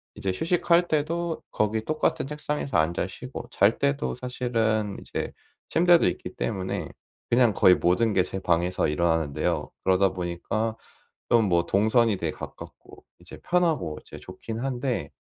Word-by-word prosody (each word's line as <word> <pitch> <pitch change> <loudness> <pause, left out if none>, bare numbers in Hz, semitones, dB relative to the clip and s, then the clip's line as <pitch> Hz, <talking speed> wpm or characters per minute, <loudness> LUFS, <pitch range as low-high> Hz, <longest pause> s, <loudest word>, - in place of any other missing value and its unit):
이제 95 - -2
휴식할 175 - +2
때도 165 +2 -1
거기 110 +1 0
똑같은 155 -1 0
책상에서 150 - -2
앉아 85 +3 +1
쉬고 125 +7 -8
잘 105 +3 +3
때도 140 0 0
사실은 115 -4 -1
이제 - - -5 0.3
침대도 175 0 +4
있기 90 +1 -4
때문에 95 -5 -3 0.4
그냥 120 -3 +4
거의 90 - +6
모든 105 +6 +2
게 95 - +3
제 95 - -5
방에서 85 +1 +1
일어나는데요. 80 -2 0
그러다 95 0 +3
보니까 95 +5 -2 0.5
좀 115 -4 +4
뭐 85 -1 +2
동선이 110 +3 +3
되게 80 -3 -2
가깝고 - - -11 0.2
이제 - - -12
편하고 160 - +1
이제 - - -12
좋긴 115 0 -7
한데 130 -1 -2
110 Hz, 315 characters per minute, -26 LUFS, 90-135 Hz, 0.5 s, 거의